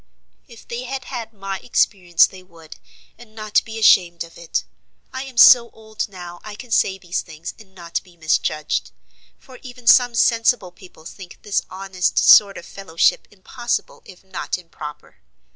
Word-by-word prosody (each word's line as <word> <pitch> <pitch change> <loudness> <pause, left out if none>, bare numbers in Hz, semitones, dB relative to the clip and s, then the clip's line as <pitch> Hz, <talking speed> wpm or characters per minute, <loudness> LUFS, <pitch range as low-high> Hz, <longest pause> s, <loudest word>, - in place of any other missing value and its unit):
"If 235 -4 -16
they 240 +2 -5
had 265 0 -5
had 240 -4 -6
my 195 -2 -6
experience 180 -7 +2
they 190 - -11
would, 165 -3 -15 0.4
and 220 -2 -16
not 215 -1 0
be 225 0 -9
ashamed 175 -6 +4
of 170 - -15
it. 170 - -3 0.5
I 260 +1 -5
am 260 -3 -12
so 235 +1 +8
old 220 -1 -6
now 175 -2 -10
I 210 -1 -9
can 245 +2 -12
say 190 -3 +2
these 180 -1 -3
things 160 +1 -9
and 190 -3 -18
not 170 -2 -4
be 180 -2 -22
misjudged; 155 - -1 0.5
for 255 -1 -16
even 250 -2 -12
some 245 0 +5
sensible 230 -4 +2
people 180 -3 -17
think 185 +1 -11
this 205 - 0
honest 190 -1 -3
sort 200 -1 +6
of - - -10
fellowship 175 -4 0
impossible 240 +5 -4
if 185 -1 -16
not 190 -1 -4
improper. 155 -4 -11
195 Hz, 165 wpm, -20 LUFS, 175-230 Hz, 0.5 s, so